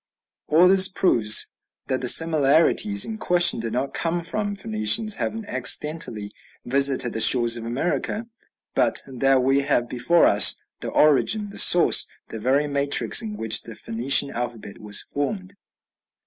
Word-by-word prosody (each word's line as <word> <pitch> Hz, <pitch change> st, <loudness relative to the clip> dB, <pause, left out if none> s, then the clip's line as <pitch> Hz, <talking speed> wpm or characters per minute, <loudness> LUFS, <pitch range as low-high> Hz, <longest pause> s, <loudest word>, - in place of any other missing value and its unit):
All 165 Hz, +4 st, +3 dB
this 190 Hz, 0 st, +3 dB
proves 115 Hz, -, +1 dB, 0.3 s
that 130 Hz, -1 st, -4 dB
the 125 Hz, -, -4 dB
similarities 165 Hz, -, +2 dB
in 220 Hz, -1 st, -8 dB
question 175 Hz, -, +2 dB
did 115 Hz, -1 st, -6 dB
not 135 Hz, +3 st, -4 dB
come 170 Hz, +1 st, -4 dB
from 205 Hz, +4 st, -4 dB
Phoenicians 110 Hz, -, 0 dB
having 225 Hz, 0 st, -5 dB
accidentally 130 Hz, -, 0 dB, 0.3 s
visited 135 Hz, -1 st, 0 dB
the 110 Hz, -, -5 dB
shores 120 Hz, 0 st, +5 dB
of 115 Hz, -1 st, -6 dB
America, 175 Hz, -, -4 dB, 0.5 s
but -, -, 0 dB
that 135 Hz, 0 st, 0 dB
we 135 Hz, +2 st, +1 dB
have 135 Hz, -4 st, -1 dB
before 145 Hz, +8 st, +1 dB
us -, -, +5 dB, 0.2 s
the -, -, -7 dB
origin, 200 Hz, +8 st, 0 dB
the -, -, -7 dB
source, 175 Hz, -, +4 dB, 0.2 s
the 110 Hz, -, -8 dB
very 135 Hz, +6 st, 0 dB
matrix 140 Hz, 0 st, +1 dB
in 215 Hz, -2 st, -8 dB
which 110 Hz, -1 st, 0 dB
the 115 Hz, -, -13 dB
Phoenician 130 Hz, +6 st, -1 dB
alphabet 115 Hz, -4 st, -8 dB
was 105 Hz, -1 st, -1 dB
formed. 185 Hz, +7 st, -6 dB
140 Hz, 150 wpm, -21 LUFS, 120-180 Hz, 0.5 s, shores